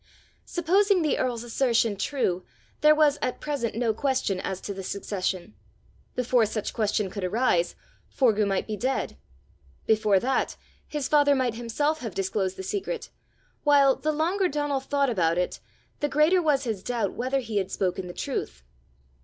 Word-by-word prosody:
Supposing 380 Hz, +2 st, +2 dB
the 305 Hz, -, +1 dB
earl's 240 Hz, -2 st, -1 dB
assertion 235 Hz, -3 st, +1 dB
true, 195 Hz, -5 st, -1 dB, 0.4 s
there 305 Hz, 0 st, +6 dB
was 300 Hz, -2 st, +3 dB
at 255 Hz, -, -2 dB
present 280 Hz, -8 st, -2 dB
no 230 Hz, -1 st, +1 dB
question 255 Hz, -6 st, 0 dB
as 190 Hz, 0 st, -3 dB
to 200 Hz, -, -5 dB
the 195 Hz, -, -6 dB
succession; 190 Hz, 0 st, -3 dB, 0.6 s
before 245 Hz, -2 st, +2 dB
such 215 Hz, 0 st, -3 dB
question 210 Hz, -3 st, 0 dB
could 200 Hz, -, -5 dB
arise, 185 Hz, -3 st, +1 dB, 0.3 s
Forgue 215 Hz, -5 st, +2 dB
might 195 Hz, -1 st, 0 dB
be 215 Hz, -, -3 dB
dead; 260 Hz, +5 st, -2 dB, 0.7 s
before 215 Hz, -3 st, +3 dB
that, 265 Hz, +6 st, 0 dB, 0.3 s
his 295 Hz, -3 st, -3 dB
father 290 Hz, -1 st, +4 dB
might 255 Hz, -3 st, +1 dB
himself 240 Hz, +7 st, -1 dB
have 225 Hz, -, -6 dB
disclosed 190 Hz, 0 st, -1 dB
the 190 Hz, -, -5 dB
secret; 410 Hz, -, -4 dB, 0.5 s
while, 280 Hz, -2 st, +5 dB
the 310 Hz, -, -1 dB
longer 350 Hz, +6 st, +1 dB
Donal 290 Hz, -3 st, -1 dB
thought 275 Hz, 0 st, 0 dB
about 170 Hz, -5 st, +1 dB
it, 180 Hz, -, -1 dB, 0.4 s
the 290 Hz, -, 0 dB
greater 310 Hz, +6 st, +4 dB
was 295 Hz, -4 st, +2 dB
his 220 Hz, -6 st, -3 dB
doubt 230 Hz, -3 st, -1 dB
whether 260 Hz, +3 st, -1 dB
he 225 Hz, -4 st, -3 dB
had 190 Hz, -1 st, 0 dB
spoken 185 Hz, -1 st, -2 dB
the -, -, -6 dB
truth. 60 Hz, 0 st, -4 dB
240 Hz, 160 wpm, -26 LUFS, 200-290 Hz, 0.7 s, there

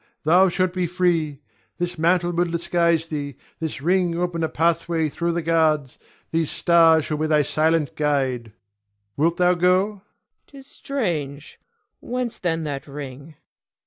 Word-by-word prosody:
Thou 180 Hz, +5 st, +5 dB
shalt 185 Hz, 0 st, 0 dB
be 180 Hz, -1 st, -1 dB
free. 165 Hz, -5 st, 0 dB, 0.4 s
This 175 Hz, 0 st, -3 dB
mantle 175 Hz, +1 st, +2 dB
will 175 Hz, +1 st, +1 dB
disguise 170 Hz, -1 st, 0 dB
thee; 145 Hz, -3 st, -4 dB, 0.2 s
this 160 Hz, -4 st, -5 dB
ring 175 Hz, 0 st, +1 dB
open 175 Hz, -1 st, -2 dB
a 160 Hz, -, 0 dB
pathway 165 Hz, 0 st, 0 dB
through 170 Hz, +3 st, -2 dB
the 170 Hz, 0 st, -2 dB
guards; 155 Hz, -4 st, +1 dB, 0.3 s
these 165 Hz, -2 st, 0 dB
stars 165 Hz, -2 st, +4 dB
shall 155 Hz, -, -2 dB
be 155 Hz, +1 st, -1 dB
thy 150 Hz, -1 st, +3 dB
silent 155 Hz, +1 st, 0 dB
guide. 130 Hz, -6 st, -1 dB, 0.6 s
Wilt 165 Hz, +4 st, +1 dB
thou 180 Hz, 0 st, +4 dB
go? 180 Hz, +2 st, +3 dB
Cleon. 210 Hz, -2 st, -12 dB, 0.5 s
'Tis 275 Hz, -2 st, -14 dB
strange! 160 Hz, -, -4 dB, 0.4 s
Whence 250 Hz, -1 st, -4 dB
then 165 Hz, -2 st, -1 dB
that 145 Hz, -2 st, -5 dB
ring? 140 Hz, +1 st, -9 dB
165 Hz, 145 wpm, -22 LUFS, 150-175 Hz, 0.6 s, Thou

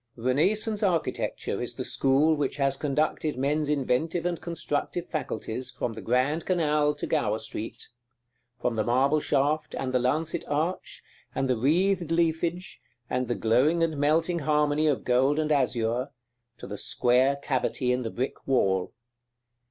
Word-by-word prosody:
§ -, -, -14 dB
II. 115 Hz, -, -8 dB
Renaissance 210 Hz, -, +1 dB
architecture 180 Hz, -6 st, -1 dB
is -, -, -4 dB
the -, -, -4 dB
school 140 Hz, +4 st, +3 dB
which 145 Hz, -3 st, -1 dB
has 135 Hz, -1 st, +2 dB
conducted 150 Hz, +1 st, -1 dB
men's 145 Hz, +3 st, 0 dB
inventive 150 Hz, +4 st, 0 dB
and 175 Hz, -1 st, -1 dB
constructive 170 Hz, +1 st, -3 dB
faculties 130 Hz, -4 st, -4 dB
from 120 Hz, -, -4 dB
the 110 Hz, -, -8 dB
Grand 130 Hz, +7 st, +1 dB
Canal 150 Hz, -4 st, +1 dB
to 145 Hz, -, -4 dB
Gower 110 Hz, -9 st, 0 dB
Street; 110 Hz, 0 st, -5 dB, 0.7 s
from 125 Hz, -2 st, -2 dB
the 110 Hz, -, +2 dB
marble 135 Hz, +6 st, +2 dB
shaft, 150 Hz, +2 st, 0 dB
and 130 Hz, -1 st, -3 dB
the 125 Hz, -, +3 dB
lancet 155 Hz, +6 st, 0 dB
arch, 155 Hz, +5 st, -2 dB, 0.3 s
and 135 Hz, -, 0 dB
the 130 Hz, -, +2 dB
wreathed 170 Hz, -, +1 dB
leafage, 170 Hz, +2 st, -1 dB, 0.3 s
and 125 Hz, 0 st, 0 dB
the 120 Hz, -, -1 dB
glowing 135 Hz, +9 st, +2 dB
and 160 Hz, -2 st, 0 dB
melting 160 Hz, +4 st, +1 dB
harmony 150 Hz, 0 st, +2 dB
of 140 Hz, -7 st, +1 dB
gold 130 Hz, +4 st, +2 dB
and 155 Hz, -1 st, 0 dB
azure, 125 Hz, -2 st, +1 dB, 0.5 s
to -, -, -9 dB
the -, -, -6 dB
square 125 Hz, +3 st, +2 dB
cavity 130 Hz, -2 st, -1 dB
in 125 Hz, 0 st, 0 dB
the 115 Hz, -, -3 dB
brick 125 Hz, +4 st, -4 dB
wall. 95 Hz, -8 st, +1 dB
145 Hz, 160 wpm, -27 LUFS, 125-160 Hz, 0.7 s, school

